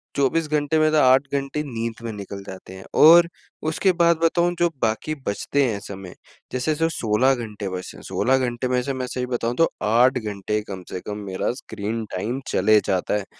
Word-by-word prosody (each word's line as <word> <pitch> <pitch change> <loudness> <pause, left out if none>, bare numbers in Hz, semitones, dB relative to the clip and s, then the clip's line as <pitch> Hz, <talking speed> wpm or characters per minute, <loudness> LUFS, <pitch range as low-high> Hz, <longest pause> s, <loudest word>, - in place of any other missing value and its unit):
24 145 +4 +1
घंटे 150 +1 +1
में 155 0 +4
तो 155 - +3
8 130 +1 +5
घंटे 140 +2 -1
नींद 115 -4 -5
में 115 - -4
निकल 100 -1 -7
जाते 95 -1 -10
हैं 95 - -11 0.2
और 170 +2 +9 0.4
उसके 185 +4 +2
बाद 170 -1 +5
बताऊँ 175 +1 +2
जो 175 - +3
बाकी 115 +8 0
बचते 140 +7 0
हैं 105 -4 -1
समय, 95 -3 -9 0.4
जैसे 130 +5 0
जो 165 +2 +1
16 125 -1 +2
घंटे 105 -4 -5
बचे 90 0 -6
हैं, - - -12
16 130 +2 +1
घंटे 125 -1 -1
में 125 0 +1
से 140 - -2
मैं 130 -1 -3
सही 125 0 -3
बताऊँ 120 -1 -2
तो 165 - +4
8 125 +5 +4
घंटे 105 -1 -3
कम 95 -2 -6
से 90 - -4
कम 105 0 -4
मेरा 95 +4 -1
स्क्रीन 110 -2 -5
टाइम 120 +8 -2
चले 105 +3 +4
जाता 95 +2 0
है 100 - -5
120 Hz, 200 wpm, -23 LUFS, 105-140 Hz, 0.4 s, और